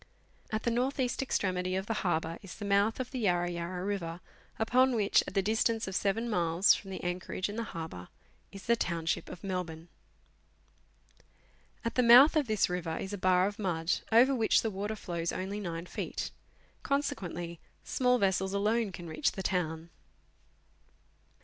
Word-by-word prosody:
At 215 0 -2
the 235 - +1
north 255 +4 0
east 250 0 0
extremity 185 -7 -1
of 190 0 -2
the 225 - -1
harbour 165 -2 -1
is 195 -4 -10
the 205 - -7
mouth 200 +3 +2
of 255 -1 -4
the 260 - -4
Yarra 175 -5 +1
Yarra 175 +2 -4
River, 175 -4 -3 0.4
upon 250 +3 +3
which, 205 -3 +4
at - - -7
the 195 - +2
distance 225 +1 +1
of 190 - -4
seven 210 +5 0
miles 175 -3 +3
from 195 - -5
the 190 - -6
anchorage 180 +1 -2
in 205 - -5
the 230 0 -3
harbour, 160 - -7 0.4
is 195 -1 -10
the 235 - +4
township 170 -5 -2
of 180 - -10
Melbourne. 175 -3 -4 2.0
At 230 - -1
the 250 - +3
mouth 250 +6 +8
of 300 -4 +2
this 215 -2 +2
river 175 -2 -3
is 190 - -5
a - - -2
bar 185 0 +4
of 205 +2 -3
mud, 170 -4 0
over 245 +5 +6
which 225 -4 +3
the 225 - -1
water 205 +3 -3
flows 170 -4 -3
only 195 +3 -4
9 170 -3 -4
feet; - - -4 0.5
con 280 +1 +1
sequently 175 - -5 0.2
small 250 -1 +2
vessels 190 -2 +1
alone 215 +1 +1
can 175 -2 -8
reach 155 -2 0
the 190 - -5
town. 165 -3 -2
190 Hz, 175 wpm, -31 LUFS, 175-225 Hz, 2.0 s, mouth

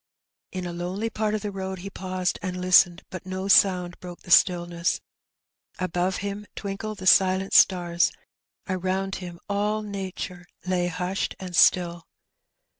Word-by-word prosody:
In 185 -1 -4
a 175 - -5
lonely 185 +6 -3
part 215 0 -1
of 215 - -4
the 205 - -3
road 190 -1 -5
he 195 - -6
paused 185 -1 -2
and 185 -2 -4
listened^ 180 -1 +4
but 185 - -7
no 185 +1 -4
sound 180 -3 +4
broke 175 -1 -10
the 175 - -10
stillness. 175 -1 +3 0.8
Above 185 +1 -1
him 205 +1 -5
twinkled 205 +1 -5
the 185 - -8
silent 190 0 +4
stars; 175 -2 +4 0.6
around 190 +1 -2
him 175 -2 -8
all 210 +1 -1
nature 190 -3 -6 0.2
lay 180 -1 0
hushed 180 +2 -2
and 185 -2 -6
still. 175 -2 +3
185 Hz, 145 wpm, -25 LUFS, 180-195 Hz, 0.8 s, listened^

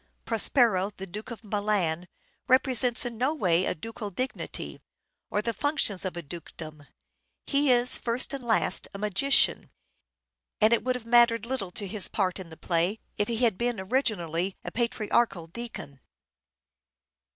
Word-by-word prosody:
Prospero, 225 -4 +3
the 195 - -5
Duke 205 +5 -8
of 235 -1 -8
Milan, 200 -5 0 0.4
represents 255 -2 +3
in 235 -2 -5
no 270 +5 +1
way 180 - +2
a - - -1
ducal 215 +5 -6
dignity, 255 +8 -5 0.5
or 210 - -1
the 230 - -1
functions 225 -7 +1
of 180 -2 -3
a 170 - -5
dukedom. 155 -1 -9 0.6
He 285 0 +2
is, 245 0 +3
first 240 +4 +1
and 275 -2 -4
last, 230 -2 +1
a - - -3
magician, 210 +7 +2 0.9
and 220 +2 +5
it 230 - +2
would 255 +1 0
have 245 -2 -7
mattered 235 -1 +5
little 240 -6 -3
to 205 - -3
his 195 0 -1
part 190 -3 -1
in 180 -3 -8
the 160 - -12
play 175 +4 0 0.2
if 205 - +1
he 235 - -1
had 225 -5 +2
been 240 -3 0
originally 190 - 0
a - - -5
patriarchal 230 -5 0
deacon. 165 - -8
215 Hz, 155 wpm, -27 LUFS, 185-240 Hz, 0.9 s, and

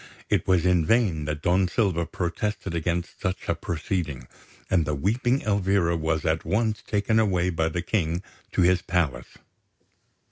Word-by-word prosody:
It - - +1
was 90 -2 +3
in 90 -2 +4
vain 90 -6 +2
that 75 0 -4
Don 90 +1 +3
Silva 90 -5 0
protested 95 +2 -3
against 85 +1 -2
such 95 -1 -3
a - - +2
proceeding; 80 -5 -3 0.4
and 85 -3 +2
the 75 0 -2
weeping 120 - +1
Elvira 95 -4 +2
was 80 0 -1
at 80 0 +1
once 110 0 0
taken 105 +2 +1
away 90 -4 +2
by 80 -1 0
the 85 +2 -3
King 85 -2 -1 0.3
to 90 - +3
his 90 0 +4
palace. 80 -9 -2
90 Hz, 155 wpm, -25 LUFS, 80-100 Hz, 0.4 s, in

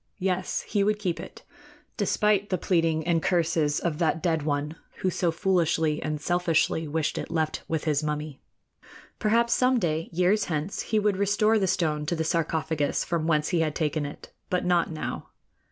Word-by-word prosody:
Yes; 185 -1 -1
he 205 -2 0
would 210 +1 +2
keep 185 -5 -2
it, - - -10 0.5
despite 210 -1 +1
the 185 - +1
pleading 165 -3 +1
and 170 -1 +2
curses 165 -4 +1
of 165 -3 -2
that 165 -1 +1
dead 165 -3 +1
one 145 +1 -2 0.3
who 185 - +2
so 175 0 0
foolishly 165 -4 +1
and 155 -1 -2
selfishly 165 -1 +1
wished 155 0 -1
it - - -6
left 160 -1 -1
with 160 -2 -2
his 150 -2 +1
mummy. 150 -1 -4 0.8
Perhaps 235 +2 +3
some 255 0 +3
day, 165 -5 -1
years 185 +4 +2
hence, 155 +3 -2
he 220 - -1
would 205 -2 +2
restore 210 +2 +3
the 190 - +1
stone 155 -5 0
to 170 - 0
the 160 - -1
sarcophagus 160 -2 0
from 165 -2 -1
whence 150 -2 +2
he 175 - +1
had 155 -2 0
taken 155 -1 0
it; 145 - -11 0.2
but 180 -1 0
not 175 -1 +2
now. 155 - -5
165 Hz, 180 wpm, -26 LUFS, 155-185 Hz, 0.8 s, Perhaps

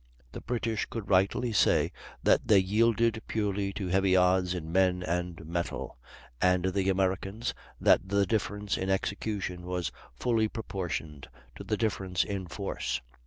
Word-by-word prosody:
The - - -7
British 115 -3 -2
could 110 -4 -6
rightly 100 +6 +2
say 105 - +3 0.3
that - - +3
they 105 - +6
yielded 110 +3 +2
purely 100 -2 -1
to 100 - -4
heavy 95 +1 +3
odds 90 0 +3
in 80 -2 -5
men 90 0 +2
and 85 -1 -3
metal; 85 -5 -4 0.4
and 90 0 +3
the 95 0 +1
Americans, 95 +4 0 0.3
that 95 - +4
the 100 0 +3
difference 105 0 -1
in 95 - -2
execution 95 -1 -2
was 90 -4 -3 0.2
fully 110 - +1
proportioned 90 -9 -5 0.3
to - - -8
the 105 - -1
difference 95 -5 0
in 100 -3 -4
force. 95 -7 -3
95 Hz, 145 wpm, -29 LUFS, 90-105 Hz, 0.4 s, they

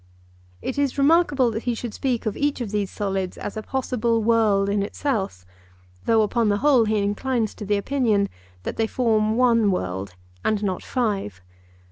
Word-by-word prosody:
It 265 +2 -3
is 280 -2 0
remarkable 280 -4 +4
that 220 +1 -5
he 240 -2 0
should 230 -1 -5
speak 250 -4 -1
of 215 - -1
each 290 -1 0
of 230 -5 -4
these 205 -2 -1
solids 195 -2 -3
as - - -6
a 215 - -3
possible 235 -2 -1
world 215 -3 +3
in 200 0 +1
itself, 200 - -2 0.6
though 225 -1 +4
upon 225 +1 +1
the 205 - +2
whole 260 -1 +4
he 215 0 +1
inclines 215 +3 -1
to 210 - -8
the 205 0 +2
opinion 215 -3 +1 0.4
that - - -4
they 225 - +1
form 220 -2 +1
one 230 -4 +4
world 95 - -3 0.3
and 215 -1 0
not 190 -3 -1
five. 200 - -2
220 Hz, 175 wpm, -23 LUFS, 200-250 Hz, 0.6 s, remarkable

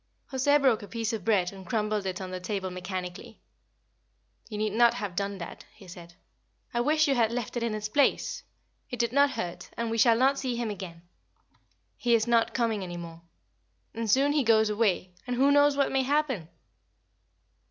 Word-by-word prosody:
José 285 +2 +3
broke 255 -5 +3
a 205 - -9
piece 230 +1 -3
of 215 -4 -4
bread 190 -5 +2
and 190 -1 -10
crumbled 210 -2 -1
it 185 0 -3
on 185 -1 -6
the 185 - -4
table 190 0 -3
mechanically. 180 0 -6 1.1
"You 210 - -5
need 215 -1 -1
not 235 +1 +4
have 200 -4 -5
done 200 +1 -2
that," 170 - -8
he 195 - -15
said. 175 -1 -12 0.6
"I 240 - +1
wish 310 +4 +3
you 275 - +3
had 230 -3 +2
left 240 -1 -4
it 240 - -1
in 230 -2 -1
its 215 0 -3
place. 275 +6 +1 0.5
It 245 - -5
did 235 0 0
no 280 +1 +5
hurt, 180 -11 -5
and 230 -1 -2
we 230 - -1
shall 230 0 +5
not 270 +3 +3
see 255 -3 -2
him 235 -2 -2
again. 175 -4 -8 0.9
He 240 -1 +2
is 220 -1 +2
not 235 -1 +2
coming 230 -4 0
any 175 -2 -6
more. 165 -1 -9 0.7
And 225 -1 -3
soon 275 +6 +4
he 290 -1 +2
goes 220 -2 +4
away; 200 -4 0
and 250 - -1
who 275 +3 +4
knows 285 0 +4
what 280 - +2
may 270 - +2
happen?" 265 - 0
225 Hz, 195 wpm, -28 LUFS, 190-250 Hz, 1.1 s, no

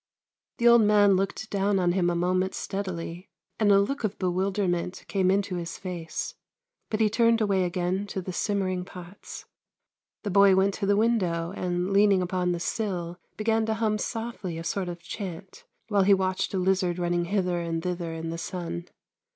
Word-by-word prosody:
The 240 - +3
old 235 -1 +8
man 205 -2 +5
looked 195 +3 -2
down 200 0 +1
on 180 -2 +2
him 175 -1 +2
a 175 - 0
moment 185 +2 0
steadily, 185 -2 -5 0.3
and 210 -2 +4
a 200 - +7
look 240 +7 -1
of 210 -2 -1
bewilderment 185 -1 -1
came 190 -2 +1
into 195 -1 +1
his 170 -1 -5
face. 175 -4 -5 0.6
But 215 - -1
he 220 - +5
turned 230 +1 +3
away 195 -4 +2
again 180 +3 -1
to 195 - -4
the 185 0 -5
simmering 185 -2 -1
pots. 180 +1 -10 0.8
The 205 - -2
boy 200 0 +6
went 195 +1 +3
to 200 -1 -3
the 200 0 +3
window, 185 -7 +1
and, 180 +1 -1
leaning 200 -2 +4
upon 180 0 0
the 175 - -2
sill, 175 -3 -3 0.2
began 225 +1 +1
to 220 - 0
hum 215 -1 0
softly 225 -8 -4
a 165 - -5
sort 185 +1 -2
of 175 0 -8
chant, 190 -2 -7 0.2
while 205 -3 +2
he 195 +1 +6
watched 190 0 -1
a - - +1
lizard 185 -1 +1
running 175 -1 0
hither 180 -2 0
and 165 -1 -3
thither 175 -2 -3
in 165 0 -4
the 165 - -5
sun. 170 -1 -5
190 Hz, 185 wpm, -27 LUFS, 175-205 Hz, 0.8 s, old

